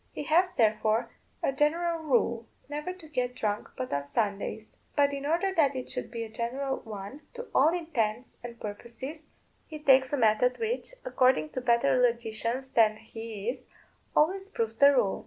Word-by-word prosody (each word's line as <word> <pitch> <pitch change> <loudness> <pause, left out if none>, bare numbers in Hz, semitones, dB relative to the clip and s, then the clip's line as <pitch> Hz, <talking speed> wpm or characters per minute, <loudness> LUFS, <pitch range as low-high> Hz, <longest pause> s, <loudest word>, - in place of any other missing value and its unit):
He - - -5
has, 345 +5 +3
therefore, 220 0 +2 0.3
a - - +2
general 330 +4 +1
rule, 240 -6 +1 0.2
never 295 +5 -4
to 365 -3 -12
get 250 -4 -2
drunk 210 -3 -2
but 255 -1 -4
on 140 0 -2
Sundays. 210 +3 -2 0.2
But 285 -1 +3
in 280 0 -3
order 350 +5 +1
that 285 -5 +3
it 255 - -4
should 255 -1 -3
be 230 -1 -4
a - - -6
general 255 +5 -2
one 210 +5 -8
to 485 0 -7
all - - +5
intents 255 -9 -2
and 235 -1 -8
purposes, 240 +9 -7 0.4
he 310 - -7
takes 265 -3 +4
a 290 - +1
method 230 +2 +3
which, 470 +2 -2
according 255 - +3
to 255 - -4
better 245 +2 +3
logicians 235 +2 0
than 220 -4 +4
he 225 -1 -8
is, 250 +1 -3 0.5
always 380 +6 +2
proves 225 - -2
the 280 +4 +7
rule. 200 -7 +2
255 Hz, 175 wpm, -29 LUFS, 225-300 Hz, 0.5 s, the